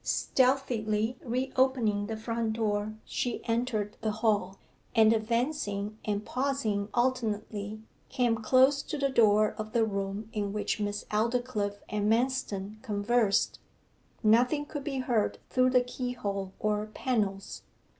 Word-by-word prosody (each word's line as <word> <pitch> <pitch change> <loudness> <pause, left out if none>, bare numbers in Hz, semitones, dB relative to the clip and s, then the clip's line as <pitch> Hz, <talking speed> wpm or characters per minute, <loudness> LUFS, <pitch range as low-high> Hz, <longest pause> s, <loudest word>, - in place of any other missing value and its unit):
Stealthily 245 -4 +1
re 255 +2 -2
opening 235 -6 +2
the 220 0 -4
front 230 0 -2
door 215 -1 -1
she 245 -2 -3
entered 230 -3 -1
the 220 - 0
hall, 210 -3 0 0.4
and 220 -1 +6
advancing 220 -2 -1
and 205 0 -2
pausing 250 -7 -1
alternately, 215 -4 -1 0.3
came 240 -3 +1
close 260 +5 +4
to 300 - -5
the 275 -1 +1
door 215 -4 +4
of 215 0 -5
the 230 -1 +3
room 200 0 -3
in 205 -2 -2
which 210 0 -1
Miss 205 0 -2
Aldclyffe 215 -2 -1
and 210 0 0
Manston 220 -4 -1
conversed. 215 -1 +1 0.6
Nothing 245 +7 +4
could 290 -1 -6
be 275 -2 -3
heard 245 -5 0
through 255 0 +4
the 250 -1 +4
keyhole 240 -6 -4
or 210 0 -1
panels. 210 -4 -2
220 Hz, 130 wpm, -29 LUFS, 210-250 Hz, 0.6 s, and